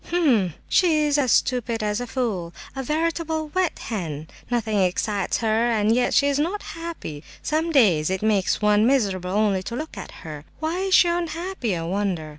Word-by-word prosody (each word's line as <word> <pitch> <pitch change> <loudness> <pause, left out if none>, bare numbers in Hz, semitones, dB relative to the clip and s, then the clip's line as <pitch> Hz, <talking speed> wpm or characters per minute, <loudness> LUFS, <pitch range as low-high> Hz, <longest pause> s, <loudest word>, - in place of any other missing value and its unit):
"H'm! 250 - +2
she 320 -5 +3
is 295 0 +2
as 260 -4 +2
stupid 235 -3 +1
as 210 +2 -1
a 245 - -4
fool! 215 -9 -3 0.2
A 270 - -3
veritable 315 +2 -1
'wet 370 -3 0
hen'! 160 -8 -5 0.2
Nothing 225 -4 0
excites 195 +2 0
her; 225 +2 +2
and 220 -1 +2
yet 245 +1 +1
she 280 - +5
is 285 0 +1
not 355 +7 -1
happy; 330 - -7 0.2
some 315 +2 0
days 185 - +4
it 190 +1 -2
makes 210 -1 +1
one 210 +1 +4
miserable 195 -9 +1
only 200 -1 +1
to 230 +5 -6
look 310 +2 -6
at - - -8
her! 150 -2 -7 0.2
Why 320 +3 -2
is 385 0 +2
she 350 - +6
unhappy, 340 - -2
I 165 - -4
wonder?" 180 -3 -2
230 Hz, 185 wpm, -23 LUFS, 195-315 Hz, 0.2 s, she